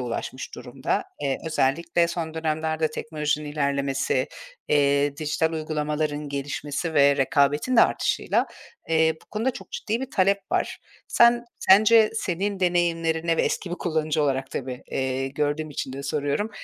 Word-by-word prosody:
ulaşmış 120 -2 -5
durumda. - - -3 0.2
Eee, 135 -1 0
özellikle 165 +3 +1
son 165 -2 -4
dönemlerde 160 0 -1
teknolojinin 150 -1 -3
ilerlemesi, 140 -2 0 0.4
eee, 140 0 +2
dijital 155 +2 0
uygulamaların 150 -1 -2
gelişmesi 145 +3 -3
ve 140 -1 +5
rekabetin 145 - +2
de - - +8
artışıyla, - - +1 0.4
eee, 160 0 +3
bu - - -20
konuda 225 +5 0
çok - - -11
ciddi 225 +2 -2
bir 265 0 -5
talep 200 +1 +3
var. - - 0 0.3
Sen 235 0 +5 0.2
sence, 215 +3 +6
senin 195 -1 -2
deneyimlerine 165 -2 +1
ve - - +2
eski 180 - -2
bir 175 - -1
kullanıcı 155 -3 -1
olarak 135 -1 -1
tabii, 125 -1 -5
eee, 130 0 -1
gördüğüm 150 +2 -2
için 135 -2 -4
de 135 +1 -6
soruyorum, 145 +9 -1
155 Hz, 140 wpm, -25 LUFS, 140-170 Hz, 0.4 s, de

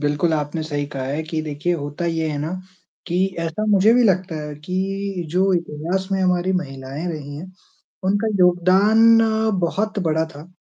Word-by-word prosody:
बिल्कुल 150 +3 +1
आपने 150 +1 -2
सही 145 -2 -3
कहा 135 - -3
है 140 +4 -2
कि 160 0 -3
देखिए 155 +3 -2
होता 145 +1 -4
ये 165 -1 -1
है 150 - -3
ना, 155 +4 -3 0.5
कि 180 +2 +1 0.2
ऐसा 165 +6 -2
मुझे 210 +2 +5
भी 250 - +5
लगता 185 -4 +1
है 150 0 -6
कि 190 0 -2
जो 190 +3 +2
इतिहास 170 +3 -2
में 190 - +1
हमारी 180 0 +1
महिलाएँ 135 +1 -6
रही 145 -2 -7
हैं, 160 +5 -7 0.6
उनका 205 +3 +1
योगदान 195 +6 +5
अ, 220 0 +1
बहुत 205 +5 -1
बड़ा 160 +1 +1
था, 150 +4 -10
175 Hz, 175 wpm, -21 LUFS, 150-190 Hz, 0.6 s, मुझे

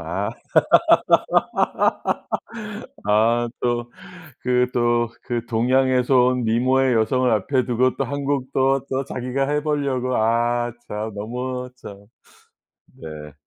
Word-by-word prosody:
아. 95 +6 -3 2.8
아 115 +3 +3
또 120 0 -1 0.5
그 125 0 +2
또 120 -1 +1
그 120 -2 -3
동양에서 130 +2 +2 0.2
온 125 - -2
미모의 130 +3 +2
여성을 125 +3 +2
앞에 120 +5 +1
두고 125 +1 +1
또 - - -1
1 140 0 -4
곡 135 -2 -1
또, 135 +1 +2
또 135 +1 -1
자기가 130 +1 -2
해 150 0 0
보려고 140 -4 -1
아 120 +2 +1 0.2
참 105 +1 -4
너무 125 +4 -4
참. 100 -4 -12 0.8
네. 75 -2 -10
125 Hz, 170 characters per minute, -22 LUFS, 115-130 Hz, 2.8 s, 아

